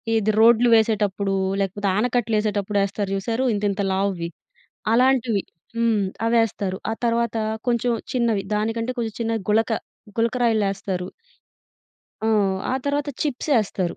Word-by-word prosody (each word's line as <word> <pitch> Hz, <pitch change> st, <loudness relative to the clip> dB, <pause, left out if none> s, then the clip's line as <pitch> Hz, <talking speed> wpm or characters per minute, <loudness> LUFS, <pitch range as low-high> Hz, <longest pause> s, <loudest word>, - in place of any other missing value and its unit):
ఇది 215 Hz, 0 st, +2 dB
రోడ్లు 235 Hz, +1 st, +6 dB
వేసేటప్పుడూ, 205 Hz, -3 st, +1 dB, 0.3 s
లేకపోతే 200 Hz, +1 st, -2 dB
ఆనకట్టలేసేటప్పుడు 215 Hz, -3 st, 0 dB
యేస్తారు 200 Hz, 0 st, -2 dB
చూశారూ 230 Hz, +6 st, -1 dB
ఇంతింత 205 Hz, -1 st, -1 dB
లావువి. 190 Hz, -3 st, -1 dB, 0.6 s
అలాంటివి. 245 Hz, -4 st, +3 dB, 0.3 s
హ్మ్. 230 Hz, -3 st, +2 dB, 0.3 s
అవేస్తారు. 220 Hz, -4 st, +1 dB
ఆ -, -, 0 dB
తర్వాతా 230 Hz, -1 st, 0 dB, 0.3 s
కొంచం 240 Hz, 0 st, +1 dB, 0.2 s
చిన్నవి. 230 Hz, -5 st, +1 dB
దానికంటే, 225 Hz, +3 st, -1 dB
కొంచుం 225 Hz, -2 st, -3 dB
చిన్న 225 Hz, 0 st, 0 dB
గులక, 225 Hz, +2 st, +2 dB, 0.5 s
గులకరాయిల్లేస్తారు. 210 Hz, -6 st, 0 dB, 1.2 s
ఆ! -, -, +2 dB, 0.4 s
ఆ -, -, +1 dB
తర్వాత 285 Hz, +1 st, -1 dB
చిప్సేస్తారు. 235 Hz, -, 0 dB
220 Hz, 105 wpm, -23 LUFS, 200-235 Hz, 1.2 s, రోడ్లు